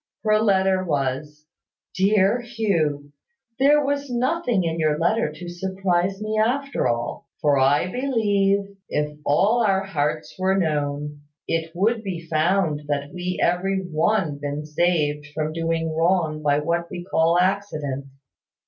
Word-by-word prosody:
Her 215 -1 +3
letter 190 -3 +2
was, 150 -1 -2 0.5
"Dear 200 +4 +3
Hugh, 170 -12 -1 0.5
"There 290 +2 +4
was 285 0 -1
nothing 245 - 0
in 165 0 -2
your 155 -1 +2
letter 170 0 +1
to 175 +3 -9
surprise 190 +1 -1
me 215 0 -2
at 275 +5 0
all; 120 -1 -1
for 145 -2 +3
I 140 +5 +3
believe, 205 -6 +1 0.2
if 150 0 -1
all 215 +12 +3
our 195 -2 +2
hearts 155 -4 -2
were 190 +1 +2
known, 150 -3 -2 0.3
it 165 0 -1
would 220 +5 +1
be 175 -4 -5
found 160 -1 +1
that 145 +1 -2
we 180 0 -3
have 175 +1 +2
every 195 +1 -1
one 170 -2 0
been 145 +1 -4
saved 150 -2 0
from 155 0 -2
doing 165 -1 -1
wrong 165 -2 +1
by 145 -1 +2
what 170 +3 -1
we 175 - -6
call 165 -1 +2
accident. 165 -8 -1
175 Hz, 140 wpm, -23 LUFS, 150-200 Hz, 0.5 s, There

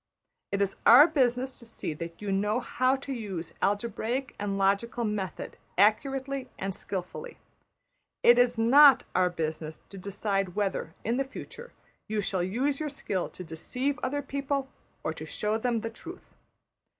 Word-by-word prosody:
It 200 0 +2
is 195 - -3
our 255 +6 +10
business 260 -4 +1
to 235 - -13
see 195 - -4
that 170 +5 -8
you 200 - -2
know 210 +4 +1
how 255 +1 +1
to 275 0 -5
use 195 -9 -5
algebraic 235 +5 -1
and 200 -1 -2
logical 200 +5 +1
method 205 -5 -3 0.2
accurately 270 +5 +2
and 195 0 -3
skilfully; 195 - -6 0.9
it 240 +1 +7
is 245 -1 +3
not 270 +5 +7
our 180 -1 +3
business 160 -2 -4
to 195 - -9
decide 195 -1 -2
whether, 195 -5 -2
in 235 +2 0
the 275 - +2
future, 470 - -10 0.4
you 215 0 -1
shall 195 -2 -1
use 255 +10 0
your 305 -1 -2
skill 200 -10 -3
to 185 - -9
deceive 250 - -3
other 285 +3 -1
people 275 0 -2 0.3
or - - -1
to - - -8
show 215 +1 -1
them 235 -1 0
the 225 - -4
truth. 340 +10 -11
225 Hz, 160 wpm, -28 LUFS, 195-265 Hz, 0.9 s, our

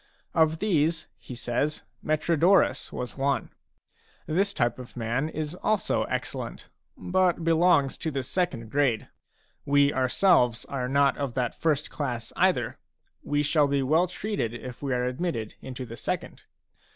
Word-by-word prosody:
Of 160 0 +3
these, 165 -4 +1
he 125 - -9
says, 120 +6 -2 0.2
Metrodorus 165 +4 +2
was 125 +2 -6
one; 140 0 0 0.7
this 195 +6 +1
type 120 - 0
of 125 0 -10
man 120 +6 -1
is 155 0 -4
also 210 +3 0
excellent, - - -4 0.3
but 180 -2 +1
belongs 165 -4 +3
to 160 - -2
the 135 -3 -2
second 130 -8 -2
grade. 140 -6 +1 0.5
We 145 0 +3
ourselves 130 - +3
are 125 -2 -3
not 140 +1 +3
of 140 -4 -3
that 125 -2 0
first 155 -2 0
class, 125 -6 -4
either; - - +1 0.4
we 145 0 0
shall 150 0 +3
be 140 -1 +1
well 160 +7 +3
treated 180 - -3
if 125 0 -8
we 140 -2 -2
are 125 0 +1
admitted 125 -4 -2
into 130 -1 -6
the 115 0 -9
second. - - -4
145 Hz, 145 wpm, -27 LUFS, 125-165 Hz, 0.7 s, Of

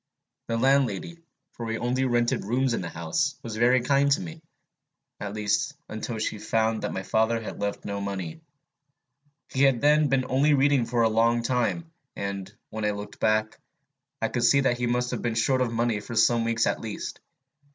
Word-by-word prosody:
The 115 - -1
landlady, 135 - +1 0.3
for 120 - -8
we 115 0 -2
only 125 +3 0
rented 120 -1 +1
rooms 125 +4 +1
in - - -1
the 85 - -5
house, 85 - -1
was 115 -2 -5
very 120 +3 +4
kind 140 +2 +2
to 160 - 0
me, 165 -3 -8 0.8
at 100 0 -5
least 105 +8 0
until 110 +1 -5
she 110 -1 -2
found 110 +1 0
that - - -2
my 95 - -4
father 110 +3 +1
had 115 - -7
left 100 0 -3
no 100 0 -3
money. 100 - -5 1.1
He 130 - -1
had 135 -3 +4
then 150 +2 +4
been 135 -1 +1
only 145 +3 +3
reading 135 -3 +3
for 120 -1 +1
a - - +5
long 115 +2 +2
time; 125 +7 -1 0.2
and, 100 -1 -4 0.2
when 110 0 -4
I 105 - +2
looked 105 0 -9
back, 110 0 +1 0.6
I 115 - 0
could 120 - -1
see 140 +4 +5
that 125 -3 +1
he 120 - 0
must 125 +1 0
have - - -3
been 120 -2 -1
short 130 +3 +2
of 125 -2 0
money 115 -2 0
for 115 +3 -8
some 115 +1 +3
weeks 115 -1 +1
at - - -1
least. 110 -2 -6
115 Hz, 195 wpm, -26 LUFS, 110-130 Hz, 1.1 s, a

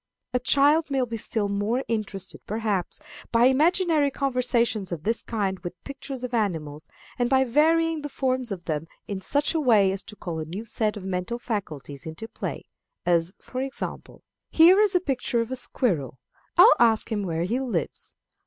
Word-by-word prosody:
A 250 - +2
child 290 +5 +3
may 270 -2 +1
be 230 -1 -5
still 220 -1 -1
more 205 +6 -1
interested, 205 -4 -3
perhaps, 210 -4 -1 0.3
by 235 +1 +5
imaginary 310 +2 +3
conversations 245 -7 +1
of 165 -3 -4
this 225 +4 0
kind 195 -4 -2
with 175 - -7
pictures 270 -2 -7
of 250 -1 -4
animals, 160 -9 -2 0.3
and 245 0 +2
by 265 0 +4
varying 320 +5 +2
the 295 - -5
form 260 -1 0
of 185 -4 -6
them 155 0 -2 0.2
in 195 -2 -4
such 285 - +1
a 325 - +1
way 215 -8 +4
as 195 0 -3
to 220 - -9
call 170 -5 -5
a 155 - -4
new 190 +8 -6
set 215 -1 -1
of 195 - -8
mental 190 +5 -2
faculties 160 - -5
into 160 +8 -7
play; - - -6 0.4
as, 170 +1 +1
for 255 - -5
example, 270 0 -6 0.3
"Here 345 +4 +7
is 410 -3 +3
a - - +6
picture 260 -6 -1
of 230 +2 -2
a - - -1
squirrel. 170 - -1 0.4
I'll 385 +8 +9
ask 230 -1 +3
him 210 -2 0
where 165 -4 -2
he 225 +8 0
lives. 230 - -3
230 Hz, 180 wpm, -25 LUFS, 190-265 Hz, 0.4 s, I'll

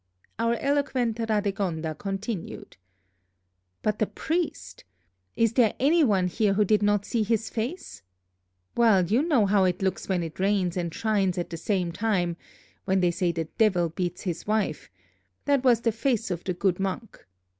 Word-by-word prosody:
Our 230 +1 +2
eloquent 265 -4 0
Radegonda 195 -8 -1
continued: 195 - -5 1.1
"But 210 - 0
the 215 - +2
priest! 315 - -3 0.5
Is 230 -1 +2
there 230 -4 +3
any 315 +5 +4
one 200 -8 +2
here 195 +3 +1
who 210 +1 +3
did 210 +1 +3
not 205 -1 +2
see 230 - -1
his 225 +1 0
face? 240 +11 -5 0.7
Well, 220 -6 +4
you 220 +9 +2
know 295 -9 +3
how 200 0 +3
it 180 +1 -1
looks 190 +1 -2
when 180 -2 +1
it 165 +1 -8
rains 190 -2 +1
and 170 -2 -2
shines 200 -2 0
at 175 - -3
the - - -4
same 180 -1 -1
time, 180 -3 0 0.5
when 190 0 +2
they 175 -1 +3
say 175 0 0
the 165 -1 -3
Devil 185 -6 +3
beats 175 +1 -4
his 175 -1 -4
wife, 210 - -1 0.6
that 280 -2 +2
was 240 -3 +4
the 230 - +2
face 230 -2 -1
of 175 -1 -3
the 185 - -2
good 185 0 0
monk. 195 +4 -4
205 Hz, 165 wpm, -26 LUFS, 180-230 Hz, 1.1 s, any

